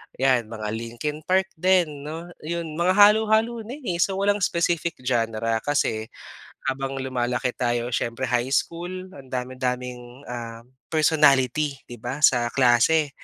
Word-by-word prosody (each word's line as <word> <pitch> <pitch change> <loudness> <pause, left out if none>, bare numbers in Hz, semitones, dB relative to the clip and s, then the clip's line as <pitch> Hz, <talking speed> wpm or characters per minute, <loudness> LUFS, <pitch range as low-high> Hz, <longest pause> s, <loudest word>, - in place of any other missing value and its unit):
'yan 130 -4 +2
mga 110 -1 -5
Linkin 115 +7 -4
Park 190 +1 +2
din 165 -6 +2
'no, 165 +3 -7
'yon, 165 0 -4
mga 185 +2 +3
halo-halo 220 +3 +5
na 255 - -6
eh. 175 -6 -2
So 190 +2 +2
walang 205 +1 +1
specific 170 -2 0
genre, 115 -2 0
kasi 110 -5 -1 0.6
habang 135 0 -4
lumalaki 125 -1 -1
tayo 120 0 -1
siyempre 120 +1 -2
high 125 +1 +1
school, 180 +4 -3
ang 140 -8 -13
dami-daming 125 0 -4
ah, 115 -1 -6 0.2
personality 150 -2 +3 0.2
'di 120 - -8
ba 125 +6 -5
sa 120 -5 +5
klase. 135 +4 +4
135 Hz, 135 wpm, -24 LUFS, 120-170 Hz, 0.6 s, halo-halo